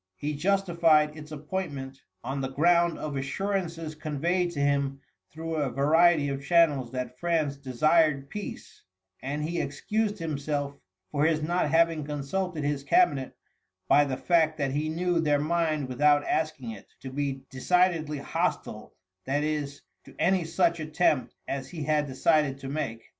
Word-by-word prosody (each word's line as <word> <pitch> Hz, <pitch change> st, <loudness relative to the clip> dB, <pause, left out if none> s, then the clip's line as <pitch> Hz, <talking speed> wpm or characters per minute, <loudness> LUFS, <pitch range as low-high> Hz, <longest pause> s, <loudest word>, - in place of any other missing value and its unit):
He 150 Hz, +9 st, -3 dB
justified 165 Hz, -3 st, +2 dB
its 155 Hz, 0 st, -10 dB
appointment 145 Hz, -4 st, -5 dB, 0.2 s
on 135 Hz, +3 st, -3 dB
the 135 Hz, -, -1 dB
ground 170 Hz, +4 st, +3 dB
of 150 Hz, -2 st, -5 dB
assurances 165 Hz, +2 st, -2 dB
conveyed 160 Hz, +4 st, -1 dB
to 145 Hz, -, -5 dB
him 140 Hz, -1 st, +1 dB, 0.3 s
through 165 Hz, +1 st, -5 dB
a 145 Hz, -3 st, 0 dB
variety 150 Hz, +4 st, +4 dB
of 140 Hz, 0 st, -4 dB
channels 145 Hz, -6 st, +3 dB
that 125 Hz, -1 st, -5 dB
France 160 Hz, -5 st, 0 dB
desired 140 Hz, +2 st, +2 dB
peace, 210 Hz, -1 st, -7 dB, 0.4 s
and 145 Hz, +3 st, -3 dB
he 170 Hz, +3 st, -1 dB
excused 210 Hz, +9 st, -2 dB
himself 145 Hz, -3 st, -3 dB, 0.4 s
for 145 Hz, 0 st, +1 dB
his 155 Hz, -1 st, +1 dB
not 175 Hz, -1 st, 0 dB
having 165 Hz, 0 st, +3 dB
consulted 150 Hz, +4 st, -3 dB
his 145 Hz, -1 st, -1 dB
cabinet 240 Hz, -, +2 dB, 0.5 s
by 145 Hz, -, +6 dB
the 135 Hz, -3 st, -2 dB
fact 160 Hz, -3 st, +2 dB
that 140 Hz, -3 st, -1 dB
he 150 Hz, +3 st, -1 dB
knew 175 Hz, +2 st, 0 dB
their 150 Hz, -3 st, +2 dB
mind 155 Hz, -2 st, 0 dB
without 145 Hz, +3 st, +3 dB
asking 155 Hz, -7 st, -1 dB
it 105 Hz, -2 st, -11 dB
to 130 Hz, -, -7 dB
be 135 Hz, -1 st, -3 dB
decidedly 160 Hz, +2 st, +1 dB
hostile, 140 Hz, -, -3 dB, 0.3 s
that 145 Hz, +2 st, 0 dB
is, 150 Hz, -2 st, -3 dB, 0.2 s
to -, -, -15 dB
any 180 Hz, -1 st, +2 dB
such 170 Hz, 0 st, +1 dB
attempt 155 Hz, -4 st, 0 dB
as 135 Hz, -1 st, -4 dB
he 160 Hz, -4 st, -6 dB
had 150 Hz, -1 st, +1 dB
decided 140 Hz, +1 st, +2 dB
to 135 Hz, -1 st, -8 dB
make. 115 Hz, -6 st, -3 dB
150 Hz, 155 wpm, -27 LUFS, 140-170 Hz, 0.5 s, by